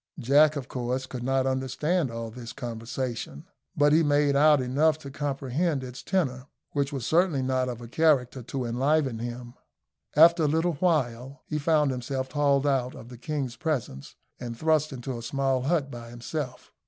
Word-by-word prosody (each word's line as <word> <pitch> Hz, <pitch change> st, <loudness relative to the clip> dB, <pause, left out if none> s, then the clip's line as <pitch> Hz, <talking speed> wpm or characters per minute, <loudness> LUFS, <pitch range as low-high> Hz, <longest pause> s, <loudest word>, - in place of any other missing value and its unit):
Jack, 145 Hz, +3 st, +4 dB
of 140 Hz, -3 st, -4 dB
course, 125 Hz, +1 st, -3 dB
could 130 Hz, -1 st, -7 dB
not 130 Hz, +1 st, +1 dB
understand 135 Hz, +5 st, 0 dB
all 115 Hz, -1 st, -5 dB
this 120 Hz, 0 st, -8 dB
conversation; 115 Hz, -, -5 dB, 0.3 s
but 145 Hz, 0 st, +4 dB
he 160 Hz, -, +5 dB
made 145 Hz, -2 st, +3 dB
out 150 Hz, +1 st, +6 dB
enough 140 Hz, +5 st, +2 dB
to 140 Hz, -3 st, -10 dB
comprehend 140 Hz, +2 st, -1 dB
its 125 Hz, 0 st, -8 dB
tenor, 140 Hz, -9 st, -1 dB, 0.2 s
which 140 Hz, -1 st, -1 dB
was 135 Hz, -5 st, -4 dB
certainly 165 Hz, -5 st, +2 dB
not 130 Hz, -1 st, 0 dB
of 120 Hz, -1 st, -6 dB
a 120 Hz, -, -8 dB
character 135 Hz, -2 st, +2 dB
to 130 Hz, +2 st, -4 dB
enliven 130 Hz, +1 st, +1 dB
him. 120 Hz, +1 st, -6 dB, 0.6 s
After 165 Hz, +1 st, +6 dB
a -, -, +3 dB
little 165 Hz, +3 st, +1 dB
time 135 Hz, -6 st, 0 dB
he 150 Hz, -, -3 dB
found 150 Hz, -2 st, +2 dB
himself 130 Hz, +1 st, -3 dB
hauled 145 Hz, -2 st, +2 dB
out 130 Hz, -3 st, 0 dB
of 120 Hz, -, -11 dB
the 125 Hz, -, -10 dB
king's 135 Hz, -2 st, -3 dB
presence 125 Hz, -, -3 dB, 0.2 s
and 120 Hz, -2 st, -6 dB
thrust 155 Hz, 0 st, +2 dB
into 125 Hz, -1 st, -5 dB
a -, -, -8 dB
small 135 Hz, +2 st, 0 dB
hut 140 Hz, 0 st, 0 dB
by 120 Hz, -1 st, -8 dB
himself. 125 Hz, +2 st, -6 dB
135 Hz, 175 wpm, -27 LUFS, 125-150 Hz, 0.6 s, out